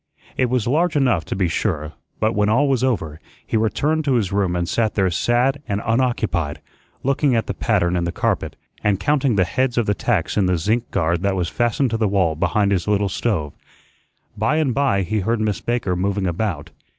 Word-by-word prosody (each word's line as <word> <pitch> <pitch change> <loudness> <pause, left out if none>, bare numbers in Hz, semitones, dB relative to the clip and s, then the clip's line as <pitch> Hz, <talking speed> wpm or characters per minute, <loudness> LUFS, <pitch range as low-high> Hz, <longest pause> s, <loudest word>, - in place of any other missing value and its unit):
It 130 -2 +1
was 125 -3 0
large 155 +6 +1
enough, 125 - +2
to - - -4
be 95 -1 +1
sure, 75 -1 -2 0.3
but 110 +1 +1
when 105 0 +1
all 135 +7 +3
was 130 -3 +1
over, 80 - -1 0.3
he - - -3
returned 145 +8 +1
to 135 -3 +2
his 105 -7 0
room 100 -3 0
and 85 -1 -1
sat 110 +3 0
there 95 -3 +2
sad 120 - +1
and 100 0 -1
unoccupied, 110 - 0 0.4
looking 140 -1 +2
at 115 - +1
the - - -3
pattern 85 +1 +1
in 85 - 0
the 85 - -1
carpet - - -1 0.3
and 105 -2 +2
counting 135 +1 +1
the 95 - +4
heads 130 +6 -1
of 120 - +2
the 105 - +1
tacks 105 -6 -1
in 100 -3 +3
the 90 -1 +2
zinc 110 +8 -1
guard 85 -2 0
that 100 0 0
was 90 -3 -1
fastened 120 +2 0
to 115 - 0
the 110 -1 +1
wall 95 -5 +2
behind 100 +5 +1
his 95 -2 0
little 100 -1 +1
stove. 90 -8 -2 0.8
By 110 +8 +1
and 155 -5 +1
by 135 -8 +1
he 105 +5 -1
heard 115 +4 0
Miss 105 -4 -1
Baker 120 -6 -1
moving 95 +2 -1
about. 85 -4 -2
105 Hz, 210 wpm, -21 LUFS, 90-120 Hz, 0.8 s, the